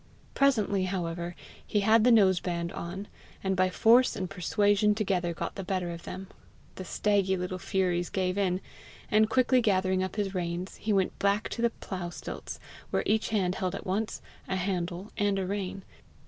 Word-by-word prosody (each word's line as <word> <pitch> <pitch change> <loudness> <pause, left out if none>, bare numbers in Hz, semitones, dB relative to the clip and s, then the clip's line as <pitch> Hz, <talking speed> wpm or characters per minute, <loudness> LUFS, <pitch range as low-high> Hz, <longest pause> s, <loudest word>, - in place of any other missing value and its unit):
Presently, 215 -8 +2
however, 175 -2 -3 0.3
he 210 - 0
had 220 +2 +5
the 245 - +6
nose 195 -6 +5
band 170 -1 -3
on, 190 +4 -6 0.4
and 190 0 +1
by 185 0 +3
force 235 +7 +5
and 185 - -3
persuasion 205 +3 +2
together 185 -5 0
got 165 - -4
the 195 - -5
better 180 -2 -2
of 170 -1 -8
them; 190 +1 -6 0.5
the 185 - -7
staggy 195 0 +1
little 180 +1 -3
furies 180 -2 0
gave 185 -1 0
in; 190 -2 0 0.5
and 215 +1 +4
quickly 255 +1 +4
gathering 190 -3 +2
up 185 -1 -3
his 200 -2 -1
reins, 175 0 -3
he 220 - -2
went 195 -2 +1
back 200 +2 +1
to 230 - -4
the 235 - +4
plough 185 -6 -6
stilts, - - -7 0.3
where - - 0
each 220 +1 +1
hand 190 -5 +1
held 185 -1 -2
at - - -7
once 205 +4 -2 0.2
a 190 - -1
handle 180 0 -2
and 205 -1 +2
a 190 - -1
rein. 195 0 -3
190 Hz, 180 wpm, -29 LUFS, 180-205 Hz, 0.5 s, the